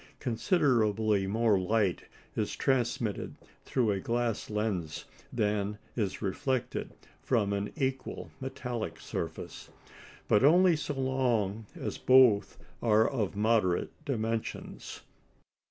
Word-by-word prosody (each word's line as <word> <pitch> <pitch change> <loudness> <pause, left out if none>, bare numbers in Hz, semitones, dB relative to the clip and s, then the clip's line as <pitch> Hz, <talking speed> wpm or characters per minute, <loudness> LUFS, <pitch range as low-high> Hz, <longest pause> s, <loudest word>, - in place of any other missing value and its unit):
Considerably 110 - +2
more 110 0 +3
light 95 -1 +1 0.3
is - - -1
transmitted 120 -5 0 0.3
through 120 -5 +1
a 100 - -1
glass 115 +1 -1
lens 105 -8 -2 0.3
than 105 -2 0 0.2
is 105 -2 -2
reflected 125 +5 -2 0.3
from 105 -6 +1
an 100 +1 -2
equal 135 -3 -3
metallic 125 -3 -4
surface. - - -6 0.6
But 105 - +4
only 175 +4 +6
so 150 -1 -3
long 120 -6 0
as - - -5
both 125 -6 +5 0.2
are 110 -1 +4
of 110 -8 -2
moderate 105 -4 +2
dimensions. 115 -4 -4
115 Hz, 105 wpm, -30 LUFS, 105-130 Hz, 0.6 s, only